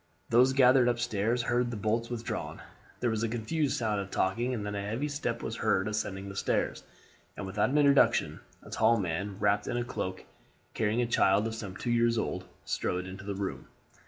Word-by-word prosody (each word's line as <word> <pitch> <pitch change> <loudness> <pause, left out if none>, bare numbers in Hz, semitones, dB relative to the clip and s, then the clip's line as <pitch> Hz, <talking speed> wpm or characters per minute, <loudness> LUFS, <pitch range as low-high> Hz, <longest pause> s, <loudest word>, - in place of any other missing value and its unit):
Those 125 +3 +5
gathered 130 -1 +5
up 120 - 0
stairs 120 0 0
heard 120 0 +1
the 120 - -4
bolts 110 +3 -1
withdrawn. 120 -1 -4 0.4
There 120 -2 +1
was 110 -1 -1
a 115 - 0
confused 135 +6 -1
sound 105 -4 0
of 95 - -7
talking 115 +9 0
and 110 -5 -3
then 105 - -3
a 100 - -2
heavy 115 +8 -2
step 140 -5 -3
was 115 - -4
heard 100 -4 +1
ascending 100 -2 -3
the 100 - -7
stairs, - - 0 0.6
and - - -4
without 105 +5 0
introduction 140 -1 +4 0.2
a - - -13
tall 115 +1 +3
man, 95 +1 -3
wrapped 100 0 +2
in 120 - -1
a 120 - 0
cloak 95 -6 -4
and - - -23 0.5
carrying 110 +2 +1
a - - +1
child 105 -3 +3
of 115 - -2
some 105 -4 -6
two 120 - -2
years 115 0 +3
old, 110 - -2 0.2
strode 90 0 -2
into 95 +1 -8
the 100 0 -4
room. 100 -1 -4
110 Hz, 205 wpm, -30 LUFS, 100-120 Hz, 0.6 s, Those